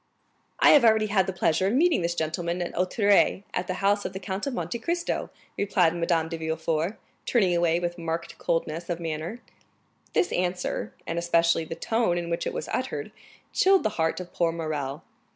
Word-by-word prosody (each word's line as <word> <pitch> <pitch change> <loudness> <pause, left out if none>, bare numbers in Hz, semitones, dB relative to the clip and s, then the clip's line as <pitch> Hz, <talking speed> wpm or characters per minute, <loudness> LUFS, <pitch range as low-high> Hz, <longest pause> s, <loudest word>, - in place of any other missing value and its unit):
"I - - +7
have 290 - +7
already 220 -2 +5
had 195 -2 +2
the - - 0
pleasure 175 0 +1
of 200 - +1
meeting 330 - +3
this 170 0 -1
gentleman 170 +2 -2
at 175 - -6
Auteuil, 200 +2 +3
at 180 - -2
the 185 - -2
house 205 0 +3
of 185 - -4
the 190 - -5
Count 190 +5 -4
of 275 - -2
Monte 235 - -3
Cristo," 340 +6 -2 0.3
replied 185 -4 +3
Madame 170 -1 +1
de 165 0 -5
Villefort, 160 +3 -1 0.3
turning 190 -7 +3
away 170 -1 +2
with 175 0 -3
marked 165 0 -4
coldness 165 +1 -2
of 175 -1 -2
manner. 165 +7 -4 0.7
This - - +2
answer, 180 - -1
and 170 - -2
especially 170 -1 +2
the 165 - -6
tone 225 -5 0
in 170 -1 -3
which 170 - -1
it - - -1
was - - -4
uttered, - - -3 0.4
chilled 385 0 +4
the - - +2
heart 160 +2 +1
of 180 -1 -9
poor 170 -1 +1
Morrel. 155 -3 -4
175 Hz, 190 wpm, -26 LUFS, 165-200 Hz, 0.7 s, I